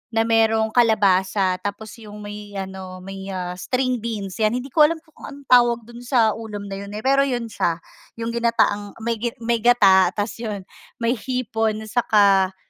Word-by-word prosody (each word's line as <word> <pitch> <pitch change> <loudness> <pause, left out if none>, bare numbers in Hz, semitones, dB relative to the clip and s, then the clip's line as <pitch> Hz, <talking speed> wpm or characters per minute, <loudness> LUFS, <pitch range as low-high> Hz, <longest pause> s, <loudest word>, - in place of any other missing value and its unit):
na 225 - +3
merong 225 -1 +2
kalabasa 195 -5 +2
tapos 205 +2 -6
'yung 210 -1 -10
may 205 0 -9
ano 190 -1 -7
may, 195 0 -8
ah, 180 -1 -4
string 255 +3 -1
beans 210 -3 -5
'yan. 215 +2 +2
Hindi 250 +1 -5
ko 300 -2 +6
alam 330 - -2
kung 315 - -13
anong 285 0 -11
tawag 240 -1 +5
do'n 235 +1 -12
sa 240 -3 +2
ulam 205 -2 -7
na 195 - -5
'yun, 200 - -8
eh, 215 - -6
pero 275 +1 +3
'yun 240 -3 -3
siya 170 -4 0 0.4
'yung 230 0 -4
ginataang 230 -3 0
may 230 -1 -1 0.2
may 235 0 +1
gata 195 -6 +5
tapos 210 +2 -3
'yun 210 -4 -5 0.4
may 235 0 +1
hipon, 225 -3 -2
tsaka 200 -4 +3
220 Hz, 175 wpm, -22 LUFS, 200-235 Hz, 0.4 s, ko